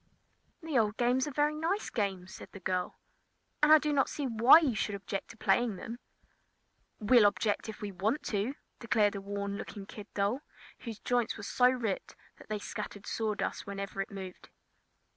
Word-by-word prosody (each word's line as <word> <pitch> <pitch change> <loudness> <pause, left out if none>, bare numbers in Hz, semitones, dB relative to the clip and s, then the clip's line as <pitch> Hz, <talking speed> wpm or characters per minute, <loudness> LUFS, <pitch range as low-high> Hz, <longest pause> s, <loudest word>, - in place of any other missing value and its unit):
"The 310 -6 +1
old 210 -1 +1
games 250 +3 +2
are - - -4
very 295 +2 +2
nice 330 +7 -1
games," 190 -4 -2
said - - -10
the 200 - -8
girl, 185 0 -2 0.6
"and 300 0 +5
I 310 - +11
do 300 -1 -1
not 275 -2 +2
see 290 - -3
why 235 +3 +8
you 305 -7 +2
should 205 -1 -1
object 195 0 -5
to 230 - -12
playing 220 +2 +2
them." 230 +6 -7 1.0
"We'll 220 0 +6
object 205 +1 0
if 220 - -8
we 205 - -3
want 210 - -1
to!" 215 +6 -1 0.2
declared 215 -3 +2
a 200 - -5
worn 200 0 -4
looking 200 -2 -7
kid 210 0 -10
doll, 205 +7 0 0.4
whose 230 -3 -7
joints 245 +1 0
were 215 - -8
so 250 +4 +4
ripped 235 -6 -2 0.2
that - - -16
they 215 - -1
scattered 205 0 -6
sawdust 215 -3 -2
whenever 200 0 -4
it 195 - -4
moved. 190 -2 -9
215 Hz, 180 wpm, -31 LUFS, 200-250 Hz, 1.0 s, I